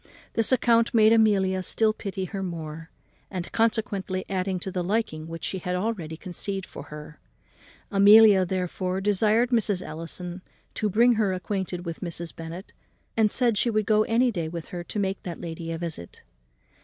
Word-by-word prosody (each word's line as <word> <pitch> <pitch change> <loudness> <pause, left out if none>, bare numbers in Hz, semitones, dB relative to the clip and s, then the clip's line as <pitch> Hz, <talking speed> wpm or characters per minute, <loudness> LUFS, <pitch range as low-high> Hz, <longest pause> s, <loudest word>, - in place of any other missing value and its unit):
This 225 +1 +3
account 235 -1 +3
made 220 0 +6
Amelia 195 -4 +3
still 215 +4 +2
pity 195 -3 -4
her 195 +1 -5
more, 165 -3 -6 0.4
and 180 -3 -5
consequently 210 -4 0
added 190 -1 -1
to 190 - -4
the 180 -1 -2
liking 180 -5 -1
which 165 0 -8
she 190 - -2
had 180 +1 -3
already 180 -5 -3
conceived 190 +2 -4
for 140 - -10
her. 150 0 -10 0.7
Amelia, 205 0 +7
therefore, 185 0 -2
desired 215 +4 +2
Mrs. 210 -6 +1
Ellison 175 +3 -6 0.3
to 215 - -1
bring 235 +5 +5
her 195 -3 +1
acquainted 185 -1 -3
with 165 -1 -5
Mrs. 170 -2 -5
Bennet, 165 +4 -8 0.4
and 220 -2 +3
said 235 -5 +3
she 240 - +2
would 215 -2 +1
go 215 0 +4
any 240 +2 +2
day 170 -6 -3
with 170 -1 -7
her 175 -1 -5
to - - -6
make 195 -1 -1
that 175 -2 -6
lady 165 -1 -6
a 165 - -3
visit. 160 - -7
190 Hz, 170 wpm, -26 LUFS, 175-215 Hz, 0.7 s, Amelia